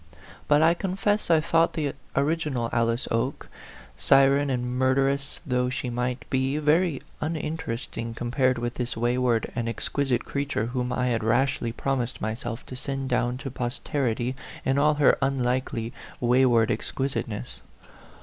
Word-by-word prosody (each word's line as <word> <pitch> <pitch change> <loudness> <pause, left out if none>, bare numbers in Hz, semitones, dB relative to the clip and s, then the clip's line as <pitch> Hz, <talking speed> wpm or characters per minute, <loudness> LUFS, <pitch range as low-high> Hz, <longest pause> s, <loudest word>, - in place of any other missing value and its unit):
But 150 +1 +5
I 165 +1 +6
confess 195 +3 -1
I 165 -2 +6
thought 165 +1 +2
the 145 -4 -1 0.2
original 140 -5 0
Alice 115 0 +1
Oke, 115 +4 -1 0.5
siren 140 +1 +4
and 125 -2 -1
murderess 135 +1 +1
though 125 -2 +1
she 125 -1 -3
might 125 +1 -2
be, 130 +2 +1
very 155 0 +2 0.2
uninteresting 150 -7 -3
compared 125 +2 +1
with 120 0 -2
this 125 -2 -3
wayward 120 -1 +1
and 115 -1 -2
exquisite 125 +1 -1
creature 140 -5 -1
whom 125 +1 -2
I 125 0 0
had 115 -2 0
rashly 120 +1 +1
promised 125 0 -2
myself 115 +2 -4
to 130 - -8
send 135 +1 -3
down 125 0 +1
to 135 - -3
posterity 125 0 -2 0.3
in 135 +1 +2
all 150 +1 +4
her 145 -1 +4
unlikely, 125 -3 0 0.3
wayward 120 -2 +4
ex 110 - -2
quisiteness. 65 - -3
130 Hz, 140 wpm, -26 LUFS, 120-140 Hz, 0.5 s, I